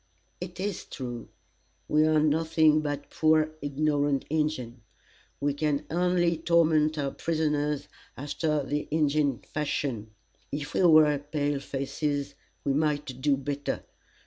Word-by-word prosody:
"It 180 0 -7
is 195 -1 -3
true. 120 -3 -7 0.6
We 155 +1 +3
are 155 -1 +4
nothing 155 0 +3
but 145 -1 -4
poor, 155 0 +3
ignorant 145 -1 0
Injins. 150 -6 -1 0.6
We 145 0 0
can 150 0 -1
only 175 -1 +2
torment 160 -2 +3
our 140 -2 -1
prisoners 150 -3 -1 0.3
after 145 +1 -1 0.2
Injin 145 -4 +1
fashion. 140 -7 -2 0.4
If 145 +1 -4
we - - +1
were 155 -3 +6
pale 145 -1 -2
faces, 140 +1 -3 0.3
we 140 - +1
might 145 -3 -1
do 140 0 +3
better. 140 +1 -3
150 Hz, 120 wpm, -28 LUFS, 140-155 Hz, 0.6 s, were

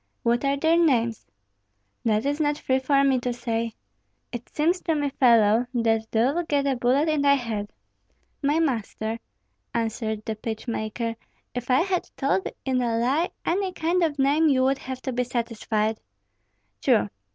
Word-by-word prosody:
"What 240 +1 +1
are 275 0 +1
their 325 +3 +3
names?" 235 -9 +1 0.8
"That 215 +1 +2
is 290 +2 0
not 295 -1 +1
free 260 -2 0
for 275 +1 +2
me 270 -2 +3
to 245 0 -2
say." 230 -2 -3 0.6
"It 240 -1 -7
seems 340 +5 +1
to 325 - 0
me, 290 -2 -1
fellow, 230 -3 +4
that 225 -1 +1
thou'lt 275 +10 +1
get 285 -2 +1
a 275 -1 +1
bullet 255 +5 +2
in 310 -2 +1
thy 280 0 +5
head." 220 -6 -4 0.7
"My 290 +2 +2
master," 230 -6 -2 0.6
answered 220 -1 -2
the 220 - -2
pitch 220 +2 -6
maker, 230 0 -3 0.4
"if 245 0 -5
I 255 +3 +4
had 365 0 -1
told 230 -9 0 0.2
in 260 -2 +1
a 230 -2 0
lie 270 +9 +1 0.2
any 375 +2 0
kind 345 +2 0
of 315 -4 +1
name, 285 +4 +3
you 260 -2 +3
would 270 +1 +2
have 260 0 -7
to 260 - -3
be 250 +1 +1
satisfied." 225 -3 -2 0.8
"True! 105 0 +3
255 Hz, 170 wpm, -25 LUFS, 230-285 Hz, 0.8 s, thy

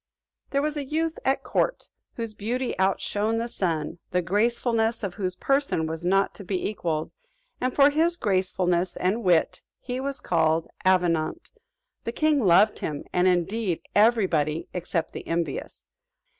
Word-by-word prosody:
There 280 0 0
was 300 0 -1
a 290 - -2
youth 320 +4 -2
at 270 +1 +1
court - - -1 0.3
whose 230 -2 -4
beauty 240 +5 -2
outshone 205 +3 +1
the 230 +1 -1
sun, 165 -8 -2
the 180 0 0
gracefulness 225 +4 +1
of 195 -3 -2
whose 185 -2 -3
person 275 - +1
was 160 +1 -5
not 195 +2 +2
to 200 - -10
be 185 -1 -2
equalled, 165 -7 -2 0.5
and 255 +1 +1
for 280 +2 +5
his 330 +3 +2
gracefulness 185 - 0
and 200 +6 0
wit, 175 -3 +2 0.2
he 250 0 -4
was 275 0 -3
called 160 -1 +1 0.2
Avenant: 180 - +1 0.5
the 230 - -3
king 300 0 +2
loved 205 +3 +5
him, 150 -2 -4
and 180 +1 +3
indeed 185 +1 +1
every 220 0 +5
body 155 -2 -1
except 175 -2 -2
the - - -8
envious. 165 0 -3
200 Hz, 155 wpm, -26 LUFS, 175-240 Hz, 0.5 s, for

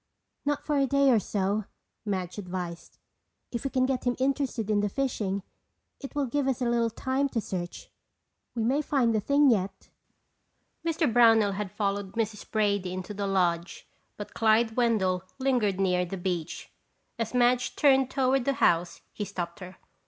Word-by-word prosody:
"Not 290 -1 -1
for 295 -2 +1
a 275 - +2
day 280 0 +4
or 230 - +5
so," 200 +1 -1 0.4
Madge 190 -2 -3
advised. 180 -3 -6 0.5
"If 235 - -4
we - - +1
can 255 -1 +1
get 260 -1 -1
him 245 0 +1
interested 260 -5 -1
in 210 - +3
the 205 0 0
fishing 205 -6 -2 0.6
it 275 0 -9
will 285 -1 +1
give 270 +2 -1
us 265 -2 0
a 250 - -1
little 235 -1 +2
time 265 +4 -1
to 240 - -1
search. 180 -4 -6 0.6
We 230 - -1
may 265 +6 +2
find 265 -6 +1
the 215 - +2
thing 280 +5 +4
yet." 195 -3 -2 0.9
Mr. 330 -1 +1
Brownell 225 -3 +5
had 200 0 -4
followed 200 -1 -2
Mrs. 220 -2 -3
Brady 200 -4 0
into 185 +2 -5
the 200 0 -3
lodge 175 -2 0 0.3
but 205 - -8
Clyde 225 0 +3
Wendell 200 -7 +1
lingered 245 -8 +1
near 180 -2 +2
the 180 +2 -5
beach. 175 -3 -4 0.5
As 230 +2 -2
Madge 245 0 +2
turned 270 -3 +4
toward 265 -1 +1
the 275 - +2
house 170 -7 +1
he 210 - -4
stopped 175 -3 -5
her. 185 0 -10
220 Hz, 170 wpm, -28 LUFS, 190-260 Hz, 0.9 s, or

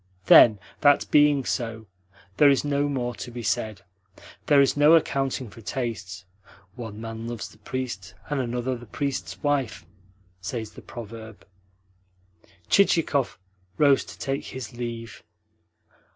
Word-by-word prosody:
"Then, 110 -3 +8 0.2
that 145 -1 +4
being 145 -3 +4
so, 115 -3 -3 0.5
there 145 - +7
is 140 +1 +2
no 145 0 +1
more 125 -3 -2
to 120 - -7
be 120 0 -7
said. 110 -3 -2 0.6
There 145 -2 +6
is 140 -1 +4
no 145 +2 +6
accounting 135 -6 0
for 115 - -13
tastes. 105 -4 -5 0.5
'One 110 -2 -8
man 115 0 -6
loves 120 -2 -5
the 105 - -20
priest, 105 -5 -5
and 145 -2 -1
another 125 +1 -2
the 120 -1 -11
priest's 140 +4 -4
wife,' 145 -5 -1 0.6
says 110 +3 -5
the - - -12
proverb." 110 -2 -10 1.2
Chichikov 160 -8 +2 0.4
rose 140 -2 +4
to - - -11
take 135 0 -3
his 130 -4 -7
leave. 115 -2 -6
120 Hz, 135 wpm, -25 LUFS, 110-140 Hz, 1.2 s, Then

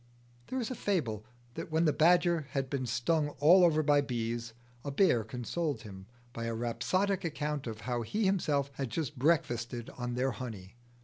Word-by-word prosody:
There 260 - -2
is 240 0 -3
a - - -3
fable 125 - -1 0.3
that - - -6
when 160 +2 +2
the 150 - +3
badger 170 -2 +3
had 135 -1 -2
been 130 -3 -1
stung 145 +6 +1
all 175 +6 +7
over 155 -3 +4
by 145 -1 +4
bees, 120 -3 -3 0.3
a 145 - -3
bear 140 - +3
consoled 125 +4 -3
him 95 -3 -10 0.3
by 115 -1 -4
a 115 0 -2
rhapsodic 185 - 0
account 150 -4 -3
of 110 -1 -6
how 120 -1 -2
he 205 - -1
himself 150 -8 +1
had 135 -2 -4
just 150 0 -3
breakfasted 125 -6 0
on 120 -1 -4
their 130 +2 +1
honey. 105 -4 -8
140 Hz, 180 wpm, -31 LUFS, 120-165 Hz, 0.3 s, all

